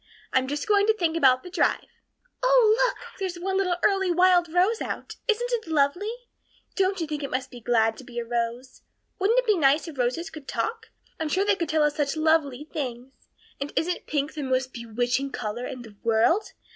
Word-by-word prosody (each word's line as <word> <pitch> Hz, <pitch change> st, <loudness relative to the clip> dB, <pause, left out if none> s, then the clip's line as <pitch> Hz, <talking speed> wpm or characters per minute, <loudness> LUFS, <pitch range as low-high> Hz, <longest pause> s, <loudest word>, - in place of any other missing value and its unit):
I'm 260 Hz, 0 st, +2 dB
just 290 Hz, +5 st, -3 dB
going 410 Hz, -1 st, +4 dB
to 440 Hz, -, +4 dB
think 330 Hz, -4 st, 0 dB
about 260 Hz, -5 st, +4 dB
the 360 Hz, -, -10 dB
drive. -, -, +1 dB, 0.6 s
Oh, -, -, +5 dB
look, -, -, -4 dB, 0.2 s
there's 375 Hz, -2 st, -2 dB
one 380 Hz, +2 st, -2 dB
little 365 Hz, -2 st, +1 dB
early 390 Hz, -2 st, +3 dB
wild 355 Hz, -1 st, +4 dB
rose 375 Hz, +6 st, +2 dB
out! -, -, -5 dB
Isn't 480 Hz, +2 st, +1 dB
it 455 Hz, -6 st, -2 dB
lovely? 320 Hz, +7 st, +1 dB, 0.6 s
Don't 385 Hz, 0 st, +1 dB
you 330 Hz, -, -1 dB
think 300 Hz, -1 st, -4 dB
it 275 Hz, -, -4 dB
must 255 Hz, 0 st, -3 dB
be 245 Hz, -, -9 dB
glad 225 Hz, -1 st, +2 dB
to -, -, -10 dB
be 245 Hz, -1 st, -11 dB
a 235 Hz, -, -2 dB
rose? 235 Hz, +2 st, -3 dB, 0.4 s
Wouldn't 415 Hz, +5 st, +2 dB
it -, -, +3 dB
be 425 Hz, -3 st, +4 dB
nice 295 Hz, +1 st, +3 dB
if 295 Hz, -5 st, -9 dB
roses 255 Hz, +8 st, -1 dB
could 310 Hz, -4 st, -11 dB
talk? 450 Hz, -, -3 dB, 0.3 s
I'm 320 Hz, -1 st, -2 dB
sure 380 Hz, +5 st, +1 dB
they 415 Hz, -, +4 dB
could 335 Hz, -5 st, -3 dB
tell 310 Hz, -1 st, +3 dB
us 295 Hz, 0 st, +1 dB
such 290 Hz, 0 st, 0 dB
lovely 310 Hz, -3 st, +1 dB
things. 255 Hz, -2 st, -5 dB, 0.5 s
And 280 Hz, +1 st, -4 dB
isn't 350 Hz, +2 st, -1 dB
pink 290 Hz, 0 st, -1 dB
the 305 Hz, -, -5 dB
most 260 Hz, -1 st, -1 dB
bewitching 245 Hz, +3 st, -1 dB
color 220 Hz, +4 st, -4 dB
in 250 Hz, -2 st, -7 dB
the 220 Hz, -3 st, -13 dB
world? 230 Hz, -, +2 dB
305 Hz, 210 wpm, -26 LUFS, 255-375 Hz, 0.6 s, Oh